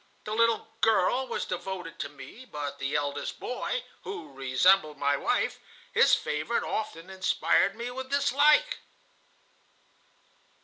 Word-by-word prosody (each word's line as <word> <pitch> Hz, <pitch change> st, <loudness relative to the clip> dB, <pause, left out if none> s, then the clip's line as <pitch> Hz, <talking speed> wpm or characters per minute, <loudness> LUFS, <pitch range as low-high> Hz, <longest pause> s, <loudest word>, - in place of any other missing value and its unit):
The 215 Hz, -, -4 dB
little 230 Hz, 0 st, +2 dB
girl 225 Hz, +4 st, +3 dB
was -, -, -3 dB
devoted 180 Hz, -1 st, -5 dB
to 140 Hz, -, -3 dB
me, 145 Hz, -, -12 dB
but 145 Hz, -, -6 dB
the 135 Hz, +2 st, -2 dB
eldest 145 Hz, -1 st, -2 dB
boy, 475 Hz, -, -3 dB, 0.2 s
who 410 Hz, -, -7 dB
resembled 150 Hz, +5 st, +3 dB
my 145 Hz, 0 st, +2 dB
wife, -, -, 0 dB, 0.3 s
his -, -, +6 dB
favorite, 150 Hz, +11 st, -2 dB
often 165 Hz, -6 st, -4 dB
inspired 190 Hz, +1 st, +2 dB
me 235 Hz, +2 st, -5 dB
with 260 Hz, +1 st, -6 dB
dislike." 290 Hz, -, +3 dB
190 Hz, 125 wpm, -28 LUFS, -, 0.3 s, his